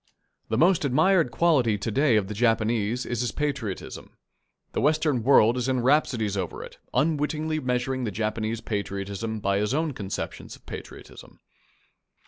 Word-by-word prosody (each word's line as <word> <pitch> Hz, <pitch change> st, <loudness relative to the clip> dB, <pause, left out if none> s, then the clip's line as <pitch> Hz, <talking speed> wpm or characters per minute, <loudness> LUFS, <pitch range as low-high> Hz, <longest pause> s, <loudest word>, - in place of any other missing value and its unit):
The 110 Hz, -, 0 dB
most 175 Hz, +4 st, +4 dB
admired 160 Hz, +4 st, +3 dB
quality 125 Hz, -5 st, +2 dB
to 110 Hz, +3 st, -3 dB
day 135 Hz, +1 st, +3 dB
of 105 Hz, -3 st, +1 dB
the 105 Hz, -, -5 dB
Japanese 115 Hz, +1 st, +1 dB
is 120 Hz, 0 st, -2 dB
his 125 Hz, -, -1 dB
patriotism. 140 Hz, -10 st, -4 dB, 0.5 s
The -, -, -2 dB
Western 150 Hz, -4 st, +2 dB
world 120 Hz, -1 st, +5 dB
is 125 Hz, +1 st, -1 dB
in 130 Hz, -1 st, +1 dB
rhapsodies 120 Hz, -6 st, +2 dB
over 95 Hz, -3 st, -4 dB
it, -, -, -12 dB
unwittingly 155 Hz, +1 st, 0 dB
measuring 125 Hz, 0 st, -1 dB
the -, -, -1 dB
Japanese 110 Hz, +2 st, -2 dB
patriotism 100 Hz, +1 st, -4 dB
by 100 Hz, -1 st, 0 dB
its 105 Hz, +6 st, 0 dB
own 155 Hz, -1 st, 0 dB
conceptions 100 Hz, -5 st, -6 dB
of -, -, -22 dB
patriotism. -, -, -10 dB
120 Hz, 150 wpm, -26 LUFS, 110-145 Hz, 0.5 s, world